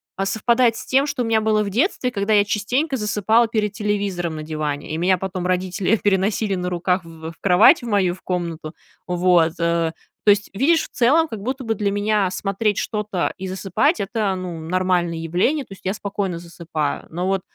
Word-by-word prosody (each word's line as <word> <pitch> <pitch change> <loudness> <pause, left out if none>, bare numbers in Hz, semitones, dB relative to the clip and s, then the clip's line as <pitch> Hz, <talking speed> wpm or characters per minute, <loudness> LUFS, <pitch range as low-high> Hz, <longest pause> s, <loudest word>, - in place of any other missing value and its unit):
а, 195 - -1
совпадает 235 +3 +2
с - - -7
тем, 270 +2 +3
что 285 -4 -2
у - - -2
меня 225 -1 +2
было 215 -1 +2
в 200 - -3
детстве, 250 - 0
когда 205 -1 0
я 205 -1 +5
частенько 250 +8 -1
засыпала 220 +2 +2
перед 215 -2 -1
телевизором 200 -5 -2
на 155 - -5
диване, 155 -2 -4
и 155 - -2
меня 185 +2 +2
потом 185 -1 -4
родители 185 +3 +1
переносили 200 +1 +1
на 180 0 -2
руках 180 +1 0
в 165 -1 -9
в - - -17
кровать, 180 +3 +6
в 240 - -7
мою, 195 -5 +2
в - - -20
комнату. 170 -4 -4 0.3
Вот, 175 -2 +3
э, 170 -1 +1 0.3
то - - +5
есть, 205 -1 +3
видишь, 310 +10 +3
в - - -8
целом 290 +7 +3
как 220 -8 -7
будто 260 +5 -3
бы 225 -2 0
для 205 0 0
меня 205 -1 +1
смотреть 200 +2 -1
что-то 210 -4 -2
и 190 - -5
засыпать, 195 - 0
это, 205 -1 -1
ну, 180 -3 -5
нормальное 175 0 0
явление. 180 - 0
То 195 - -11
есть 195 - -16
я 190 - 0
спокойно 200 -4 -3
засыпаю. 165 -3 -4
Но 175 +3 -3
вот 195 -1 0
195 Hz, 200 wpm, -21 LUFS, 175-220 Hz, 0.3 s, кровать